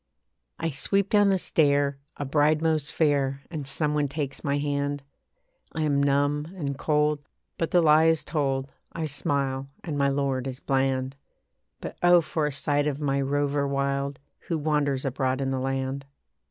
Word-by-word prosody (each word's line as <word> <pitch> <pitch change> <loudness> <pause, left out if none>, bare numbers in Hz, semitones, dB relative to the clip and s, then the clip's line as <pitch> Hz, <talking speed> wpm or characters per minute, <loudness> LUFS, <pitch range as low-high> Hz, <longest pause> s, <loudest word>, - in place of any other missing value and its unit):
I 165 0 -2
sweep 195 +8 0
down 205 -1 +5
the 195 - +3
stair, 145 -5 +2 0.2
a 145 - -3
bride 150 +2 +3
most 160 -1 0
fair, 140 -4 +1
And 150 -5 -4
some 150 +2 0
one 150 -1 +1
takes 140 -1 -4
my 140 -1 0
hand. 145 0 -1 0.7
I 160 - -1
am 145 -2 +2
numb 145 +1 +1
and 140 -5 -3
cold, 150 +1 +1 0.4
but 165 - 0
the 175 -1 +4
lie 155 +1 +6
is 160 -1 +3
told, 135 -3 -1 0.2
I 165 -1 -3
smile 140 -2 -2
and 150 -4 -3
my 140 - +3
lord 135 -2 0
is 130 -1 -6
bland. 135 -1 0 0.7
But - - -7
oh! 175 0 +7
for 155 -1 -1
a - - -2
sight 145 +1 0
of 145 -1 -2
my 140 -2 0
rover 145 +1 0
wild, 140 0 -1 0.3
Who 165 - 0
wanders 145 -3 0
abroad 130 0 0
in 135 -1 -1
the 130 - -1
land. 135 +1 -2
145 Hz, 170 wpm, -26 LUFS, 135-150 Hz, 0.7 s, oh